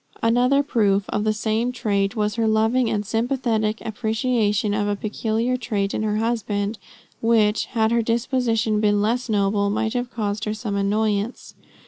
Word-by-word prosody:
Another 250 +5 +3
proof 205 -7 +1
of 210 - -1
the 215 - +3
same 220 +3 -1
trait, 205 -4 -1
was 210 -1 0
her 225 0 0
loving 225 +3 +2
and 210 -1 -1
sympathetic 225 -1 0
appreciation 220 -2 0
of 205 0 0
a 205 - 0
peculiar 225 +4 -1
trait 205 -5 -2
in - - -1
her 210 -1 0
husband, 215 -2 -1 0.4
which, 225 -2 +3
had 220 -2 0
her 235 0 +3
disposition 230 -2 0
been 205 -1 +2
less 235 +4 0
noble, 200 -1 +1
might 220 +2 -1
have 245 0 -2
caused 210 -4 -3
her 215 0 -2
some 215 -2 -4
annoyance. 205 +2 -1
220 Hz, 160 wpm, -22 LUFS, 210-235 Hz, 0.4 s, Another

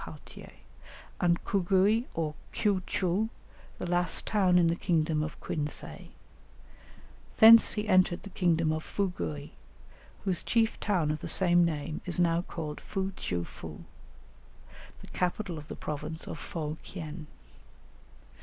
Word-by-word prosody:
Pauthier), - - -11 0.7
and 175 -1 +1
Cugui 200 +4 +2
or 155 -2 -1 0.2
Kiou 200 -3 +1
tcheou, 195 +4 0 0.5
the - - -5
last 175 0 +1
town 190 -4 +3
in 175 - +5
the 165 0 +2
kingdom 160 -3 +1
of 155 0 -5
Quinsay; 150 -1 -4 1.3
thence 225 0 +9
he 210 0 -3
entered 185 -3 +3
the 200 - -9
kingdom 165 -4 +2
of 155 0 -2
Fugui, 80 - -3 0.7
whose 185 -3 -1
chief 230 -1 +1
town 175 -7 +1
of 155 - -3
the - - -6
same 175 -2 +4
name 155 -2 -2
is 180 0 +1
now 170 -1 +3
called 160 -4 -6
Fou 195 -1 -3
tcheou 90 - -3
foo, - - -10 1.2
the - - -12
capital 180 -1 -2
of 150 - -12
the - - -6
province 155 +2 -5
of - - -6
Fo 155 -2 -5
kien. 160 -3 -8
175 Hz, 135 wpm, -29 LUFS, 155-190 Hz, 1.3 s, thence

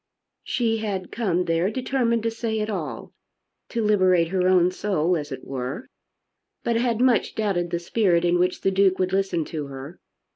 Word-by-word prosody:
She 230 -2 0
had 200 -4 -4
come 180 -6 0
there 165 +3 +1
determined 240 -2 0
to 230 - 0
say 225 -1 -3
it 215 0 -2
all, 175 -7 -5 0.6
to 230 - -1
liberate 185 -5 +3
her 185 0 +1
own 180 -1 +4
soul 180 -3 0
as 150 -3 -4
it 130 -1 -7
were, 135 - -4 0.8
but 235 - 0
had 230 -1 +1
much 250 -3 +2
doubted 195 -5 0
the 170 - -1
spirit 175 -1 +1
in 175 0 +2
which 180 +1 0
the 195 - +2
Duke 190 -1 +3
would 185 0 -1
listen 190 -4 0
to 150 -3 -5
her. 140 +5 -9
185 Hz, 180 wpm, -24 LUFS, 170-220 Hz, 0.8 s, own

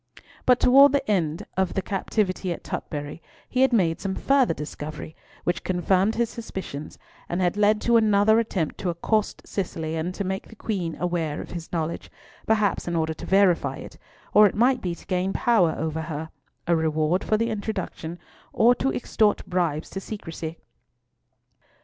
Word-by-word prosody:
But 250 -1 +5
towards 275 +2 +7
the 275 -1 0
end 170 -1 0
of 190 -1 0
the 195 - +1
captivity 195 -2 -1
at 170 - -5
Tutbury, 145 +2 -5 0.3
he 255 - 0
had 265 - +5
made 175 -8 +2
some 190 -1 -2
further 270 -10 +2
discovery, 150 +1 -7 0.3
which 175 -1 -1
confirmed 185 +3 +1
his 235 -1 0
suspicions, 190 -10 -7 0.3
and 175 - -1
had 180 0 +1
led 210 +1 +3
to 235 -1 +4
another 220 0 +4
attempt 190 -8 -2
to 185 - -1
accost 205 +5 -1
Cicely, 160 -4 -3
and 165 +3 -2
to 200 - -2
make 190 +1 -3
the 225 - -14
Queen 185 -7 -3
aware 165 -4 -1
of - - -8
his 170 -2 -7
knowledge, 165 -1 -3 0.4
perhaps 215 -4 +1
in 175 - -1
order 160 -1 0
to - - -9
verify 190 -3 +3
it, - - -11 0.3
or 210 0 +8
it - - -4
might 250 +4 +3
be 175 -2 -2
to - - -16
gain 185 +1 -1
power 215 -9 +3
over 160 0 -2
her, 160 0 -5 0.3
a 170 - +3
reward 160 +2 +1
for 215 - +1
the 230 +1 0
introduction, 195 -5 -4 0.3
or 240 +2 +5
to 265 +2 0
extort 215 -3 +1
bribes 170 -4 -1
to 195 - -4
secrecy. 165 -5 -6
185 Hz, 175 wpm, -25 LUFS, 165-215 Hz, 0.4 s, or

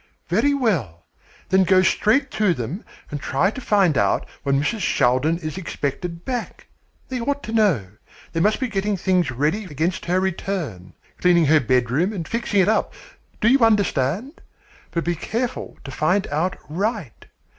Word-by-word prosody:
"Very 285 0 +2
well, 150 - -1 0.4
then 190 +1 +4
go 185 0 +4
straight 255 +8 +2
to 205 -5 +2
them 130 - -5 0.3
and 145 -1 -4
try 145 +10 +1
to 255 - -8
find 195 - +3
out 100 - +1 0.2
when 140 -1 +1
Mrs. 215 +11 -1
Shaldin 135 0 +2
is 160 +1 -5
expected 170 +1 -4
back. 250 -3 -4 0.4
They 255 -2 -3
ought 285 +3 -2
to - - -6
know. 205 - +2 0.5
They 165 - 0
must 210 +5 +2
be 260 - 0
getting 205 -2 -1
things 185 -1 +1
ready 150 - -1
against 165 +2 -2
her 180 +2 +1
return 170 - -3 0.2
cleaning 175 -2 +4
her 155 +2 +5
bedroom 130 - +1
and 170 -5 -5
fixing 230 -4 +1
it 185 - +2
up. 220 - +1 0.5
Do 215 - +3
you 265 +3 +5
understand? 210 - +1 0.5
But 170 - -2
be 175 - 0
careful 235 +8 -4
to 135 - -8
find 180 +8 +1
out 175 +6 -1
right. 190 - -3
180 Hz, 165 wpm, -22 LUFS, 150-215 Hz, 0.5 s, her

